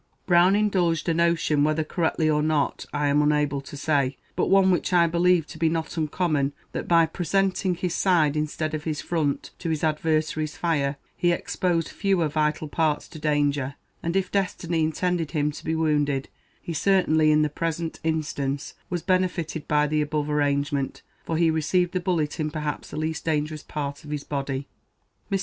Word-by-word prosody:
Mr. - - -43
Brown 180 +2 +5
indulged 180 -6 +1
a 165 - +3
notion, 165 -3 +2
whether 155 +1 +1
correctly 160 0 0
or 150 -1 +2
not 150 -2 0
I 145 0 -1
am 145 +1 +3
unable 150 -2 +1
to 140 +1 -10
say, 140 -3 +1 0.2
but - - +1
one 195 -1 +5
which 180 - 0
I 175 -1 +6
believe 170 0 +3
to 160 - -10
be 165 -1 +3
not 160 -1 -3
uncommon, 155 -3 0 0.2
that - - -4
by 165 -1 +5
presenting 185 +2 0
his 175 0 -2
side 165 -7 +3
instead 155 +1 -2
of 155 -1 -4
his 155 -2 -2
front 155 -5 -1
to 170 - -3
his 160 -1 -1
adversary's 155 -1 0
fire, 145 -5 0 0.2
he 175 - +2
exposed 170 -1 -1
fewer 190 -5 +1
vital 155 +1 0
parts 150 -1 0
to 155 - -10
danger; 145 -2 0 0.3
and 170 +2 -2
if 190 -1 0
destiny 175 -4 -1
intended 165 +1 0
him 150 -2 0
to - - -10
be 160 - -1
wounded, 145 -4 +1 0.3
he 170 - -6
certainly, 160 -3 +3
in 155 0 +4
the - - +2
present 165 +2 -3
instance, 145 -3 -2 0.2
was 175 -2 -3
benefited 180 -4 0
by 150 0 +3
the 150 +1 +1
above 150 0 -1
arrangement, 140 -1 0 0.2
for 165 - -2
he 165 -1 +3
received 170 +3 +1
the 185 - -1
bullet 170 -5 -1
in 155 -1 0
perhaps 150 -1 -4
the - - -7
least 155 0 -2
dangerous 155 -1 -1
part 145 -2 -5
of 150 - -11
his 150 -1 -3
body. 140 -1 -3 0.6
Mr. 195 - +2
155 Hz, 185 wpm, -25 LUFS, 150-170 Hz, 0.6 s, I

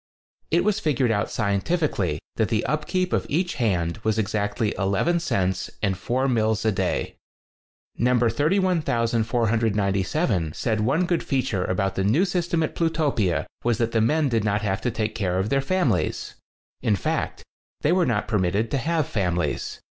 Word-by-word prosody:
It 170 +2 +3
was 210 0 +1
figured 130 -6 +1
out 105 -1 0
scientifically 100 - 0 0.2
that 110 - +1
the 115 -1 0
upkeep 180 +5 -1
of - - 0
each 175 +4 0
hand 90 -5 0
was 110 0 0
exactly 105 0 -1
11 100 - +1
cents 95 - -1
and 100 -2 +1
four 125 +8 -1
mills 110 -3 +1
a 110 - +4
day. 95 -2 -2 0.8
No. 125 +1 +3
31497 115 - +1
said 110 +2 -1
one 145 +11 +2
good 175 -1 0
feature 120 -9 -1
about 95 +1 0
the 95 - -1
new 125 - +3
system 175 -3 0
at 155 - -2
Plutopia 140 - 0 0.2
was 120 -2 +1
that 115 -1 0
the 115 - +2
men 150 +7 +2
did 115 -5 +1
not 105 0 0
have 95 -2 -1
to 125 - 0
take 110 -1 -2
care 95 -5 -1
of 95 +3 0
their 135 0 +2
families. 135 - 0 0.5
In 110 -4 +2
fact, 95 - -2 0.4
they 150 - +2
were 180 -1 +3
not 110 -4 0
permitted 100 +2 0
to 140 - +1
have 160 +2 0
fam 90 -7 -1
ilies. 85 -4 -2
115 Hz, 165 wpm, -24 LUFS, 100-150 Hz, 0.8 s, a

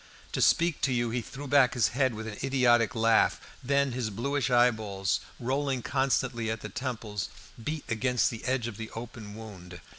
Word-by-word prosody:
To - - -1
speak 170 -2 +3
to 135 - +2
you 120 -2 0
he 120 +1 -1
threw 140 +5 -8
back 135 -3 +4
his 120 -5 +3
head 130 -2 +1
with 110 +1 -6
an 105 -2 -6
idiotic 120 -4 +3
laugh; 115 0 +3 0.2
then 140 +1 +2
his 120 -2 -2
bluish 135 +7 -1
eyeballs, 110 -6 +2 0.2
rolling 130 0 -1
constantly, 130 -3 0
at 110 0 -3
the 105 - -6
temples 110 -5 -4 0.3
beat 150 +3 -3
against 120 +2 +1
the 115 - -7
edge 130 -2 0
of 115 -4 -7
the 110 0 -6
open 115 -3 -8
wound. 95 -5 -10
120 Hz, 180 wpm, -29 LUFS, 110-130 Hz, 0.3 s, back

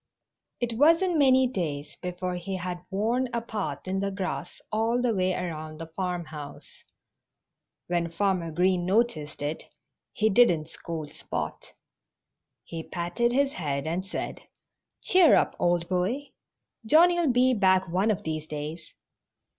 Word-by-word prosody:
It 235 -1 -2
wasn't 330 +3 +4
many 260 -2 +5
days 150 - -4
before 180 0 -3
he 180 +2 -4
had 180 -1 -5
worn 230 +6 0
a - - +2
path 220 -5 -5
in 190 +1 -1
the 200 0 0
grass 190 -1 -4
all 225 +3 +1
the 245 -2 +1
way 185 -2 +1
around 155 -3 -5
the 165 - -6
farmhouse. 165 -4 -6 1.0
When 170 -1 -1
Farmer 180 -1 0
Green 180 +2 +2
noticed 180 -8 0
it 150 +2 -3 0.5
he 215 - +1
didn't 175 -9 +4
scold 160 -3 -6
Spot. - - -5 0.9
He 165 -1 -6
patted 175 +9 -1
his 275 +2 +2
head 140 -4 -2
and 170 +4 -1
said, 195 - -5 0.6
"Cheer 365 -3 +6
up, - - +2
old 175 -1 +1
boy! 195 +11 -1 0.5
Johnnie'll 335 +4 +5
be 250 +1 +4
back 190 -3 +3
one 185 +6 +1
of 210 - 0
these 155 -1 -4
days." 155 +2 -6
185 Hz, 140 wpm, -27 LUFS, 165-235 Hz, 1.0 s, Cheer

